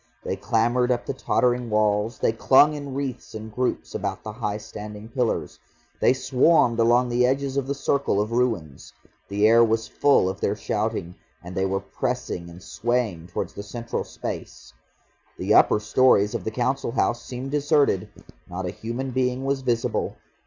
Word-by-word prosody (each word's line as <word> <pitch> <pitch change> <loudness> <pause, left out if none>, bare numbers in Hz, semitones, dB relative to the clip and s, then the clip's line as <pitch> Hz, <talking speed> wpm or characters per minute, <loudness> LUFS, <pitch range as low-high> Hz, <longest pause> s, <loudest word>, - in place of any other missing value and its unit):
They - - -2
clambered 120 +2 +1
up 120 -1 -1
the - - -2
tottering 125 -2 0
walls, 105 +1 +1
they - - +2
clung 135 +6 +5
in 145 -2 -6
wreaths 130 -5 -5
and 110 0 -7
groups 125 +2 -2
about - - -3
the 110 - -5
high 105 -2 -3
standing 105 0 -9
pillars. 120 -1 -2 0.4
They - - +5
swarmed 130 -2 +3
along 120 +2 +4
the 120 +1 +2
edges 135 +1 0
of 140 -2 -1
the 140 - -1
circle 140 -6 0
of 105 +2 -1
ruins. 115 - -2 0.3
The 105 +1 +2
air 115 +1 +6
was 115 0 +1
full 140 -9 +3
of 95 +1 -4
their 100 - +1
shouting, 105 -3 -2 0.3
and 90 +1 -8
they 95 +1 0
were 95 +1 -1
pressing 85 -3 -4
and 85 +2 -12
swaying 110 -6 -2
towards 90 - -4
the - - -6
central 115 +3 -4
space. - - -7 0.6
The - - +1
upper - - +5
storeys 105 -1 +3
of - - -4
the - - 0
Council 125 +2 -1
House 120 0 +1
seemed 130 +2 -6
deserted, 145 - +2 0.4
not 90 +1 -4
a 90 - -2
human 120 +4 -5
being 130 +1 0
was 135 0 0
visible. 120 -3 -1
115 Hz, 175 wpm, -24 LUFS, 105-130 Hz, 0.6 s, air